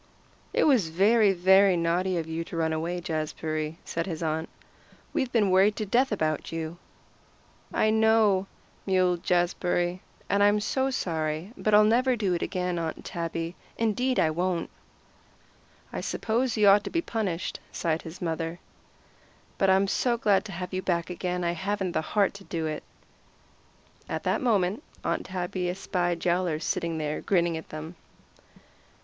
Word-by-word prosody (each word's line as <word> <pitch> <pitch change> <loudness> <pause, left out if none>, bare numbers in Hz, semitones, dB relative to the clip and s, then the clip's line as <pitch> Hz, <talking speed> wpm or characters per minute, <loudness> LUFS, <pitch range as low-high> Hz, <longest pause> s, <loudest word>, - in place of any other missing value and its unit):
"It - - +2
was 245 - +4
very, 205 +5 +4
very 190 +1 +5
naughty 175 +2 +1
of 165 - -2
you 160 +1 -3
to 165 - -7
run 160 -1 +1
away, 170 +3 -2
Jazbury," 155 -2 -3
said 165 +2 -3
his 165 -2 -4
aunt. 160 0 -1 0.6
"We've 260 -2 0
been 210 -5 +3
worried 195 +3 +5
to 215 - -3
death 245 +6 +2
about 155 -7 -1
you." 165 +1 -5 0.9
"I 215 - +2
know," 220 -3 +3 0.4
mewed 185 -2 +2
Jazbury, 175 0 +1 0.3
"and 200 - +2
I'm 205 +1 +5
so 265 +5 0
sorry. 160 - -2
But 215 -1 +2
I'll 210 - +8
never 245 +4 +3
do 200 -5 0
it 170 - -1
again, 180 -2 -1
Aunt 165 -1 -4
Tabby. 165 0 -4 0.2
Indeed 245 +3 +1
I 160 - +3
won't." 175 +1 -1 1.2
"I - - -3
suppose 235 +2 -1
you 210 -1 +5
ought 200 +1 +7
to - - -3
be 335 0 -1
punished," 195 - -3
sighed 160 -1 -1
his 165 +3 -9
mother, 165 0 -3 1.0
"but 195 - +3
I'm 190 +1 +4
so 240 +4 +1
glad 205 -3 +2
to 210 - -7
have 180 +1 -6
you 185 - -1
back 175 -1 -1
again 180 0 -2
I 170 - +1
haven't 190 +2 -2
the - - 0
heart 200 +4 +1
to 200 0 -11
do 165 -4 -3
it." 155 -1 -3 1.3
At - - -3
that - - 0
moment 210 -2 +1 0.2
Aunt - - -1
Tabby 180 0 -2
espied 175 -2 -2
Yowler 175 -2 +1
sitting 165 +1 -2
there 150 -1 -2
grinning 175 -3 +1
at 160 - -7
them. 155 +3 -7
180 Hz, 160 wpm, -27 LUFS, 165-205 Hz, 1.3 s, I'll